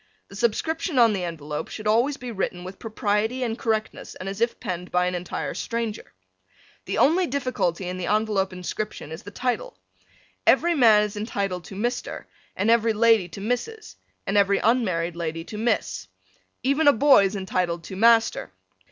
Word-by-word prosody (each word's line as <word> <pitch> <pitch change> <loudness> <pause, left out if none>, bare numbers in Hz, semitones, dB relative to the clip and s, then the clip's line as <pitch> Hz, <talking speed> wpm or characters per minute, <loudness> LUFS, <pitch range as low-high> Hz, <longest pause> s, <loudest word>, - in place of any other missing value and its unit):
The 195 - -12
subscription 285 - -1
on 230 -3 +6
the 190 -3 -2
envelope 150 -3 -5
should 215 - -8
be - - +2
always 260 +6 +2
written 195 -7 -4
with 185 +1 -9
propriety 220 +2 -1
and 225 -2 -1
correctness 220 -2 -3
and 185 - -7
as 195 +2 -5
if 235 0 0
penned 180 -5 -5
by 180 0 +2
an 180 - -1
entire 180 0 -4
stranger. 230 -2 -4 0.7
The - - -3
only 350 +4 +4
difficulty 250 - -1
in 180 0 -4
the 175 - -3
envelope 210 -3 +1
inscription 180 -2 -5
is 160 - -7
the 205 - -9
title. 255 - -3 0.7
Every 345 +1 +5
man 225 -8 +6
is 210 -1 -4
entitled 200 -4 -3
to 195 - -9
Mr. 240 +5 -3 0.3
and 205 +4 +2
every 230 -1 +3
lady 220 -3 +4
to 180 +4 -9
Mrs. 245 - -3 0.3
and 195 - 0
every 200 0 +4
unmarried 185 -8 +1
lady 165 -1 -4
to 210 - -8
Miss. 95 - -1 0.6
Even 280 +4 +2
a 285 - +8
boy 265 -4 +6
is 195 +2 -2
entitled 180 -3 -2
to 190 - -8
Master. 225 - +3
210 Hz, 175 wpm, -24 LUFS, 185-240 Hz, 0.7 s, a